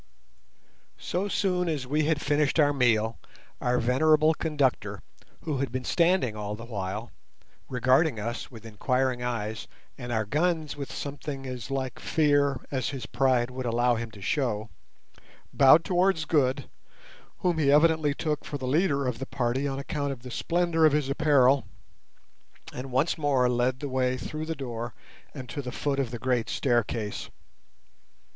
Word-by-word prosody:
So 185 +3 -2
soon 180 -3 0
as 145 -5 -2
we 150 +4 0
had 155 -1 +1
finished 145 +1 +1
our 145 -1 +4
meal 115 -4 +2 0.4
our 125 0 +1
venerable 155 +6 +4
conductor, 150 -5 -1 0.4
who 150 -5 -2
had 135 -2 -2
been 130 0 -3
standing 170 - +2
all 105 0 -4
the 115 +2 -9
while, 105 0 -5 0.6
regarding 130 +1 +2
us 115 +4 -4
with 115 -3 -12
inquiring 125 +3 0
eyes, 110 -3 -3 0.3
and 120 -1 -6
our 110 -2 0
guns 155 - 0
with 140 -2 -6
something 140 -1 -6
as 125 -3 -6
like 130 -2 -3
fear 145 -3 +2
as 130 -2 -1
his 135 -3 -5
pride 125 -1 +1
would 130 0 -4
allow 120 +1 +2
him 115 0 -3
to 100 -3 -12
show, 110 -3 -1 0.8
bowed 140 +4 +6
towards 180 -3 +2
Good, 140 -4 +1 0.7
whom 175 -3 +1
he 140 -2 +3
evidently 155 -1 +4
took 150 -2 -2
for 145 - -5
the 130 - -6
leader 140 0 +1
of 125 -2 -2
the 135 - -5
party 130 +2 -1
on 135 -1 -3
account 140 0 -3
of 125 -3 -8
the 125 - -8
splendour 170 +4 +1
of 155 -2 +6
his 150 -2 +1
apparel, 140 -2 +3 1.1
and 130 +1 -6
once 140 +6 +1
more 135 -4 +2
led 125 +1 0
the 145 - -3
way 130 -1 0
through 155 +5 -5
the 160 - -2
door 120 -4 -5 0.4
and 130 -3 -7
to 145 +1 -4
the 125 -2 -6
foot 140 0 -1
of 135 -4 0
the 120 - -5
great 120 -2 0
staircase. 115 -4 -1
135 Hz, 165 wpm, -27 LUFS, 120-150 Hz, 1.1 s, bowed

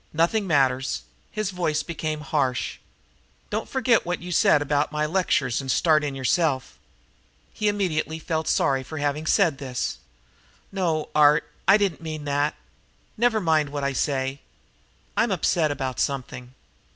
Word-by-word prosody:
"Nothing 175 +6 +1
matters." 135 - +1 0.3
His 215 -2 -3
voice 170 -4 -1
became 155 -2 -4
harsh. 135 -3 -1 0.7
"Don't - - -3
forget 250 -3 +2
what 175 0 -2
you 180 +1 -7
said 150 - +4
about 145 0 0
my 150 0 0
lectures 150 -7 +1
and 135 - -7
start 155 +2 +3
in 140 -2 -3
yourself." 135 0 0 0.7
He 215 - -1
immediately 180 -6 0
felt 160 0 -3
sorry 135 -1 +2
for 155 +5 -8
having 145 +1 -1
said 165 -9 +3
this. 130 -3 -3 0.7
"No, 170 -5 -1
Art, 150 0 +5 0.2
I 200 - +7
don't 200 -6 -1
mean 155 -2 -6
that. 145 +1 0 0.6
Never 235 -1 +2
mind 160 -5 +2
what 145 0 -4
I 140 0 0
say. 135 0 -1 0.8
I'm - - +2
upset 160 -3 +1
about 135 -3 -3
something." 130 -2 -3
150 Hz, 145 wpm, -24 LUFS, 140-170 Hz, 0.8 s, I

